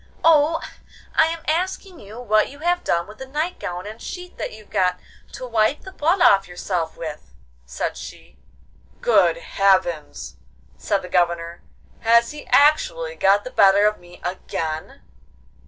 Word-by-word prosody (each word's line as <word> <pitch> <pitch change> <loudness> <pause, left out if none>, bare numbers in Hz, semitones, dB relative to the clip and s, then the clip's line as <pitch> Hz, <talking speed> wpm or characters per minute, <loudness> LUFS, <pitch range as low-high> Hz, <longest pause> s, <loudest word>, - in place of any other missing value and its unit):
'Oh, 325 0 +4 0.5
I 320 - +4
am 330 0 -5
asking 365 +2 -2
you 210 +4 -11
what 215 -3 +2
you 285 - -12
have 350 +3 0
done 170 0 0
with 210 +1 -14
the 265 - -7
night 305 +6 -3
gown 180 +1 -5
and 215 +2 -9
sheet 360 0 -8
that - - -3
you 215 0 -13
got 180 -2 0 0.3
to 255 - -7
wipe 230 +3 +1
the 380 - -10
blood 340 +2 +1
off 195 - +5
yourself 175 -2 -3
with,' 150 - -7 0.4
said - - -3
she. - - -11 0.6
'Good 180 -8 +3
heavens!' 170 - 0 0.4
said 190 - -1
the - - -7
Governor, 170 -1 0 0.4
'has 235 +1 +3
he 295 0 -10
actually - - +3
got 200 - +3
the 255 - -8
better 200 +1 +5
of 210 0 +1
me 175 0 -16
again? 160 -3 -5
210 Hz, 155 wpm, -22 LUFS, -, 0.6 s, off